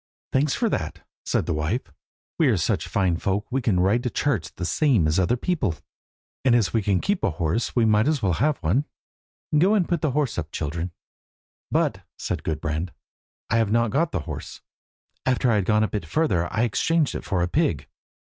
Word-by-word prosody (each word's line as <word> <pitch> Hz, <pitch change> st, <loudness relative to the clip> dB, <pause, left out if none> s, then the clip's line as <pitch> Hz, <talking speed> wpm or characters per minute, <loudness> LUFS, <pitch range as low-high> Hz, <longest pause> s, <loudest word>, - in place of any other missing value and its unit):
"Thanks 135 Hz, +2 st, +2 dB
for 235 Hz, -, +1 dB
that!" 80 Hz, -, -3 dB, 0.2 s
said -, -, +1 dB
the -, -, -1 dB
wife; 80 Hz, +11 st, -1 dB, 0.6 s
"we -, -, +5 dB
are -, -, +3 dB
such -, -, 0 dB
fine 95 Hz, -4 st, +1 dB
folk 100 Hz, +3 st, -1 dB
that -, -, -43 dB
we 135 Hz, +2 st, 0 dB
can 105 Hz, -7 st, +1 dB
ride 100 Hz, +6 st, +3 dB
to 125 Hz, -, -1 dB
church 110 Hz, -, -1 dB
the 90 Hz, -, -4 dB
same 120 Hz, -, +3 dB
as 75 Hz, +4 st, +2 dB
other 110 Hz, +7 st, +2 dB
people, 120 Hz, -, -1 dB, 0.7 s
and 130 Hz, -2 st, +4 dB
as 110 Hz, -6 st, +2 dB
we 115 Hz, -, +2 dB
can 95 Hz, -2 st, +1 dB
keep 200 Hz, -2 st, -1 dB
a -, -, +3 dB
horse 85 Hz, +7 st, -1 dB
we 120 Hz, -2 st, +4 dB
might 110 Hz, +2 st, +3 dB
as 155 Hz, -2 st, +2 dB
well 95 Hz, -3 st, +2 dB
have 145 Hz, -, +1 dB
one. 110 Hz, -, +2 dB, 0.7 s
Go 185 Hz, +8 st, +4 dB
and 190 Hz, -5 st, +2 dB
put 175 Hz, -, 0 dB
the 155 Hz, -, +1 dB
horse 135 Hz, -7 st, 0 dB
up, 80 Hz, -1 st, -6 dB
children." 80 Hz, +3 st, -3 dB, 0.8 s
"But," -, -, +1 dB, 0.2 s
said -, -, -3 dB
Gudbrand, 80 Hz, +2 st, -2 dB, 0.6 s
"I 115 Hz, -, +4 dB
have 115 Hz, -3 st, +2 dB
not 115 Hz, -1 st, +2 dB
got 160 Hz, +4 st, +1 dB
the -, -, -2 dB
horse. -, -, -7 dB, 0.6 s
After 125 Hz, -1 st, +2 dB
I -, -, +3 dB
had 100 Hz, -, 0 dB
gone 105 Hz, +2 st, +3 dB
a -, -, +2 dB
bit 100 Hz, -7 st, -4 dB
further 90 Hz, -, +1 dB
I 110 Hz, +1 st, +1 dB
exchanged 155 Hz, +6 st, +1 dB
it -, -, -5 dB
for 90 Hz, -3 st, 0 dB
a -, -, +1 dB
pig." 90 Hz, -, 0 dB
110 Hz, 210 wpm, -24 LUFS, 85-135 Hz, 0.8 s, we